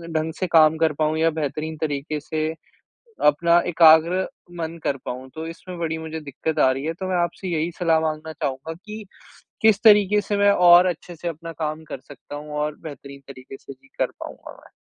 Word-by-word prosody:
ढंग 160 +1 -1
से 185 - 0
काम 160 -2 +5
कर 160 -1 +2
पाऊँ 155 +1 0
या 165 +1 +4
बेहतरीन 155 +1 -4
तरीक़े 150 0 -2
से 155 -1 -2 0.8
अपना 170 +4 +4
एकाग्र 165 +2 +5 0.3
मन 165 0 -4
कर 140 - 0
पाऊँ। 130 +1 -6
तो 160 +1 -5
इसमें 175 +2 -9
बड़ी 160 -1 -2
मुझे 160 0 -6
दिक्कत 150 +2 -4
आ 130 - +5
रही 135 +3 -4
है 165 - -1
तो 185 +3 -6
मैं 185 - 0
आपसे 175 +2 -5
यही 165 +1 -1
सलाह 165 -3 +3
माँगना 155 0 -3
चाहूँगा 140 +2 -4
कि 215 0 -7 0.6
किस 215 -2 +4
तरीक़े 210 -2 +6
से 205 0 -2
मैं 205 0 +5
और 175 -1 +7
अच्छे 175 0 -5
से 170 +2 -7
अपना 165 0 -6
काम 155 +1 -3
कर - - -7
सकता 145 +1 -11
हूँ 150 0 -8
और 150 0 -2
बेहतरीन 140 -2 -10
तरीक़े 135 0 -11
से 140 - -11
भी 135 +1 -25
कर - - +1
पाऊँगा - - -9
मैं। - - -19
160 Hz, 200 wpm, -23 LUFS, 150-175 Hz, 0.8 s, और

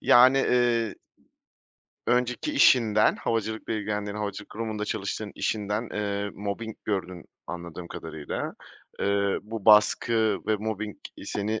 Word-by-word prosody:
Yani, 130 +2 +7
eee 120 -4 +2 1.1
Önceki 125 - +1
işinden, 110 - +5
havacılıkla 110 -1 -2
ilgilendiğin, 105 -1 -2
havacılık 105 -1 -5
kurumunda 110 -1 -3
çalıştığın 105 0 -3
işinden, 105 +2 -1
eee, 100 -1 -2
mobbing 105 +2 -4
gördün, 95 -4 -3 0.2
anladığım 85 0 -7
kadarıyla. 80 -2 -5 0.4
Eee, 100 0 +1
bu 110 -1 -7
baskı 110 0 +5
ve 110 -1 +2
mobbing 105 0 -4 0.3
seni, 105 +2 -2
105 Hz, 110 wpm, -27 LUFS, 100-110 Hz, 1.1 s, Yani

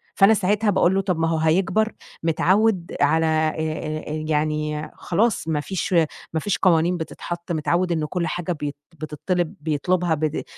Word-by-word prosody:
فأنا 200 +2 +6
ساعتها 210 +1 +1
باقول 190 -1 +3
له 195 - +2
طَب 185 -4 -1
ما 165 - +2
هو 165 - +1
هيكبر، 190 +7 +2 0.3
متعود 185 +3 +2
على 160 +3 +3
آآ، 155 0 -1 0.2
يعني 150 0 -1
خلاص 205 0 0
ما 160 -2 0
فيش، 185 +4 -3 0.4
ما 160 - +1
فيش 200 +4 -1
قوانين 175 -1 +3
بتتحط، 170 +1 -6
متعود 170 +3 0
إن 160 -2 0
كل 170 +2 -2
حاجة 175 +2 -3
بيت 150 -3 -3 0.2
بتطلب 155 +3 -2
بيطلبها 165 +3 0
بت 155 0 -2
165 Hz, 155 wpm, -23 LUFS, 155-185 Hz, 0.4 s, فأنا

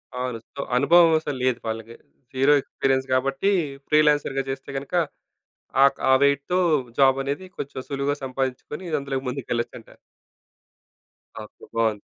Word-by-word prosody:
అవును. 125 -2 -3 0.2
సో 140 - -3
అనుభవం 165 +6 +6
అసలు 145 -4 -4
లేదు 125 -2 +1
వాళ్ళకి. 115 +1 -5 0.4
జీరో 135 +3 +4
ఎక్స్‌పీరియన్స్ 135 0 -1
గాబట్టి, 135 +8 +1 0.4
ఫ్రీలాన్సర్‌గా 150 -2 +3
జేస్తే 135 +1 -5
గనక 135 +3 -7 0.9
ఆక్ 140 - +2
ఆ - - +7
వెయిట్‌తో 140 +5 +2 0.4
జాబ్ 135 -1 +5
అనేది 140 +7 -3
కొంచెం 140 -1 -5
సులువుగా 140 +1 -1
సంపాదించుకొని 135 +6 -4
అందులోకి 135 -1 -4
ముందుకెళ్ళచ్చంటారు. 120 -2 -5 1.5
ఓకే. 105 - -15
బావుంది. 110 -2 +1
135 Hz, 120 wpm, -24 LUFS, 130-140 Hz, 1.5 s, ఆ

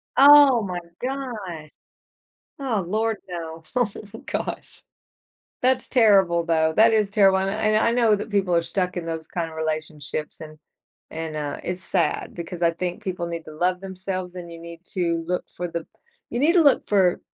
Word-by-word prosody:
Oh 280 -4 +8
my 180 -2 -3 0.2
god! 220 - -5 0.9
Oh 230 -8 -1
lord 220 +2 0
no. 165 -2 -6
Oh, 245 -3 +3 0.4
gosh. - - -5 0.8
That's 255 0 +2
terrible, 195 -8 +4
though. 160 -1 +2
That 225 +3 +5
is 210 -2 +2
terrible, 195 -2 +4
and 190 0 0
I 215 +2 -3
I - - +4
kn - - +1
I 230 - +3
know 230 -3 +4
that 210 +2 -6
people 195 -4 +1
are 170 - +4
stuck 180 +1 -2
in 170 - -4
those 160 -1 -5
kind 170 -2 -3
of 160 - -12
relationships, 155 -1 -4
and 155 0 -10 0.5
and, 160 -1 -5
uh, 145 -1 -4
it's 180 +1 -4
sad 175 -3 -1
because 170 0 -7
I 170 - +4
think 180 +5 -4
people 180 -3 -3
need 170 -1 -6
to 155 - -10
love 180 +3 0
themselves, 185 -1 -5
and 170 -1 -8
you 165 - -9
need 170 +1 -11
to 170 -3 0
look 180 0 -1
for 175 0 -3
the 170 -1 -5 0.4
you 240 - -3
need 320 +5 +4
to 350 - +6
look 285 -3 +4
for 190 -4 +3
180 Hz, 185 wpm, -24 LUFS, 165-215 Hz, 0.9 s, Oh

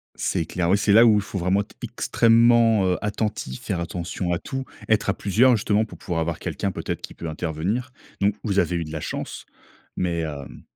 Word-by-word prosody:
C'est 80 - -1
clair. 85 0 -1
Oui, 100 - +5
c'est 100 0 +2
là 115 +3 +8
où 110 -3 +5
faut 100 -1 -5
vraiment 95 +3 +2
être 105 - -11
extrêmement, 115 -2 +4
heu, 90 - +1
attentif, 105 - -3
faire 90 - -2
attention 85 +1 -3
à 85 - -1
tout, 135 0 -5 0.2
être 110 -2 +2
à - - +3
plusieurs 115 +7 +3
justement 105 +1 +1
pour - - -12
pouvoir 85 -2 -3
avoir 85 0 -2
quelqu'un 100 - -2
peut-être - - -4
qui - - -8
peut 85 - -7
intervenir. 85 +11 -2 0.3
Donc, 100 +1 +3
vous 100 -3 +1
avez 90 - +1
eu 85 - -1
de 75 - -8
la 80 -1 -4
chance - - -5 0.6
mais 85 -2 0
hem 75 -4 -6
100 Hz, 205 wpm, -24 LUFS, 85-110 Hz, 0.6 s, là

